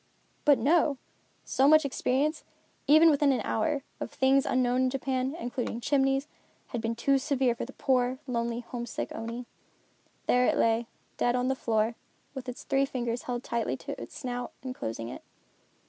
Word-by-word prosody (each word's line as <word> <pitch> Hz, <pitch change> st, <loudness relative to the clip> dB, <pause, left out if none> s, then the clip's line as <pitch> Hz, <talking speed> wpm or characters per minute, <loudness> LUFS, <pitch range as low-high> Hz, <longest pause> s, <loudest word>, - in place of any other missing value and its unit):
But 290 Hz, -2 st, +6 dB
no! 305 Hz, -2 st, +3 dB, 0.5 s
So 270 Hz, -, +3 dB
much 310 Hz, 0 st, +6 dB
experience, 280 Hz, +3 st, 0 dB, 0.4 s
even 315 Hz, +3 st, +7 dB
within 285 Hz, -1 st, +3 dB
an 250 Hz, -4 st, +1 dB
hour, 275 Hz, +8 st, 0 dB, 0.2 s
of -, -, -4 dB
things 270 Hz, +1 st, +3 dB
unknown 255 Hz, 0 st, +2 dB
in 260 Hz, -, +3 dB
Japan, 265 Hz, +1 st, -1 dB
including 240 Hz, -4 st, -3 dB
chimneys, 270 Hz, +1 st, +1 dB, 0.4 s
had 240 Hz, -, -3 dB
been 230 Hz, 0 st, -1 dB
too 270 Hz, +4 st, +2 dB
severe 265 Hz, -3 st, +1 dB
for 230 Hz, -, -5 dB
the 265 Hz, -, -11 dB
poor, 255 Hz, -1 st, +1 dB
lonely, 235 Hz, -2 st, -2 dB
homesick 240 Hz, -1 st, -5 dB
Oni. 230 Hz, +2 st, -5 dB, 0.8 s
There 250 Hz, 0 st, +3 dB
it -, -, +2 dB
lay 230 Hz, +1 st, +2 dB, 0.3 s
dead 240 Hz, 0 st, +2 dB
on 250 Hz, +1 st, +1 dB
the 265 Hz, -, +1 dB
floor, 225 Hz, -2 st, +1 dB, 0.4 s
with 265 Hz, -2 st, -6 dB
its 250 Hz, -, -7 dB
three 275 Hz, 0 st, +1 dB
fingers 240 Hz, -2 st, -3 dB
held 245 Hz, 0 st, -2 dB
tightly 235 Hz, -1 st, -1 dB
to -, -, -7 dB
its -, -, -9 dB
snout 245 Hz, -2 st, -4 dB
and 260 Hz, -1 st, -4 dB
closing 115 Hz, -, -5 dB
it. 125 Hz, -, -8 dB
255 Hz, 170 wpm, -29 LUFS, 240-275 Hz, 0.8 s, even